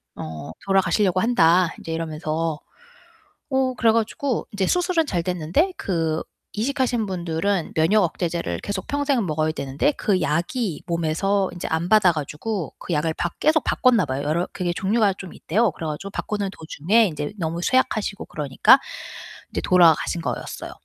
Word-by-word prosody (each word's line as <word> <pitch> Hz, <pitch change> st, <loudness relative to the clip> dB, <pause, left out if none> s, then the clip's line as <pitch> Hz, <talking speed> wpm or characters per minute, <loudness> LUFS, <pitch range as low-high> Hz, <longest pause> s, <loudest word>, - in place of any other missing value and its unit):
어 80 Hz, 0 st, -7 dB
"돌아가시려고 195 Hz, -1 st, +2 dB
한다." 180 Hz, -6 st, +4 dB
인제 165 Hz, -, -7 dB
이러면서. 160 Hz, -1 st, -2 dB, 0.9 s
어 265 Hz, -1 st, +2 dB
그래 230 Hz, -2 st, +3 dB
가지고 230 Hz, +3 st, -1 dB
인제 200 Hz, -2 st, -1 dB
수술은 355 Hz, -2 st, +2 dB
잘 175 Hz, -, -1 dB
됐는데 180 Hz, -, 0 dB
그 165 Hz, -4 st, -1 dB, 0.3 s
이식하신 245 Hz, 0 st, 0 dB
분들은 180 Hz, 0 st, -2 dB
면역 190 Hz, +7 st, +4 dB
억제제를 170 Hz, -, -2 dB
계속 200 Hz, -2 st, -4 dB
평생 285 Hz, -5 st, 0 dB
먹어야 155 Hz, -1 st, 0 dB
되는데 140 Hz, -, 0 dB
그 195 Hz, -8 st, 0 dB
약이 170 Hz, -, -1 dB
몸에서 175 Hz, +4 st, 0 dB
인제 175 Hz, -1 st, -6 dB
안 160 Hz, +2 st, -1 dB
받아 210 Hz, -5 st, +5 dB
가지고 160 Hz, +5 st, -4 dB
그 175 Hz, -, -4 dB
약을 160 Hz, +1 st, 0 dB
바 175 Hz, -, -1 dB
계속 315 Hz, 0 st, +3 dB
바꿨나 240 Hz, -8 st, +3 dB
봐요. 135 Hz, 0 st, -3 dB
여러 160 Hz, +4 st, 0 dB
그게 180 Hz, -2 st, -1 dB
종류가 200 Hz, +2 st, +2 dB
좀 190 Hz, -1 st, -10 dB
있대요. 215 Hz, +5 st, +1 dB
그래 160 Hz, +1 st, -6 dB
가지고 155 Hz, +6 st, -5 dB
바꾸는 205 Hz, 0 st, -3 dB
도중에 190 Hz, +8 st, +2 dB
인제 150 Hz, -2 st, -4 dB
너무 165 Hz, 0 st, -2 dB
쇠약하시고 215 Hz, -3 st, 0 dB
그러니까 150 Hz, -, +4 dB, 0.7 s
인제 -, -, -3 dB
돌아가신 170 Hz, -2 st, +4 dB
거였어요. -, -, -5 dB
180 Hz, 355 characters per minute, -23 LUFS, 160-215 Hz, 0.9 s, 받아